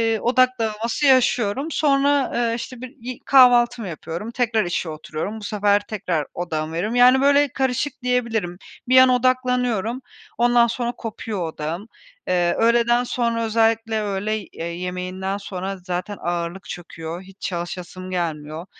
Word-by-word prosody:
ııı, 220 - -4
odak 255 +1 +4
dağılması 225 +5 -1
yaşıyorum. 255 -1 +3
Sonra, 280 -2 +2
ııı, 235 -1 +1
işte, 245 +1 -7
bir 255 -1 -9
i 250 +1 -6
kahvaltımı 245 -4 +5
yapıyorum, 170 +6 -6
tekrar 235 -4 +1
işe 175 -1 -2
oturuyorum. 155 +7 -5
Bu - - -11
sefer 205 -1 +2
tekrar 180 -8 -2
odağımı 160 -2 -3
veriyorum. 205 +8 -2
Yani, 250 +2 +6
böyle, 285 +1 +5
karışık 265 +2 0
diyebilirim. 230 -7 0 0.3
Bir 255 +1 +5
an 260 0 +8
odaklanıyorum, 250 -2 +1 0.4
ondan 240 0 +4
sonra 240 +1 -2
kopuyor 220 -6 -5
odağım. 165 +7 -5 0.4
Eee, 175 -1 +2
öğleden 235 +1 +3
sonra, 235 -2 -1
özellikle 225 0 +1
öğley 210 +1 -2
ııı, 165 - -3
yemeğinden 180 +2 -4
sonra 195 -1 -5
zaten 185 +2 -4
ağırlık 175 +2 -3
çöküyor, 170 -1 -7
hiç 190 +1 -17
çalışasım 180 +1 -5
gelmiyor. 160 -2 -3
220 Hz, 140 wpm, -22 LUFS, 180-245 Hz, 0.4 s, an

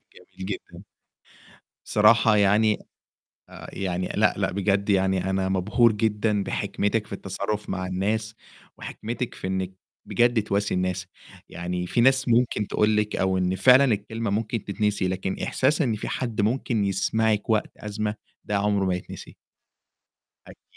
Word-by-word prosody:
جميل 95 - -11
جدًا. 100 - -7 1.0
بصراحة 110 +1 +4
يعني 105 +1 +3 0.7
آآ، - - -10
يعني 90 -1 -2
لأ، - - +3
لأ، - - 0
بجد 100 +1 0
يعني 95 -1 +2
أنا 95 0 0
مبهور 105 +5 +3
جدًا 105 -1 0
بحكمتِك 105 +3 -1
في - - -8
التصرُّف 100 +2 -4
مع 95 -1 -3
الناس، 105 +4 -2 0.4
وحكمتِك 120 +3 -5
في - - -6
إنِّك 95 0 -2 0.3
بجد 120 -2 +2
تواسي 100 0 -1
الناس، 90 0 -1 0.4
يعني 90 +1 -4
في 120 - +1
ناس 130 +1 +4
ممكن 120 -3 +2
تقول 105 0 +2
لِك 105 0 0
أو 95 0 +1
إن 90 0 0
فعلًا 130 +6 +6
الكلمة 110 +2 -3
ممكن 110 +1 -2
تتنسي، 105 -1 -1
لكن 95 +1 -3
إحساس 150 +5 +1
إن 120 -6 +1
في 105 - -6
حد 115 -4 -2
ممكن 115 0 0
يسمعِك 105 +2 0
وقت 110 -1 +1
أزمة 105 0 -3 0.3
ده 105 - -1
عُمره 100 -1 +1
ما 90 -1 +1
يتنسي. 90 - -9 1.1
أكيد، - - -18
105 Hz, 145 wpm, -25 LUFS, 95-110 Hz, 1.1 s, فعلًا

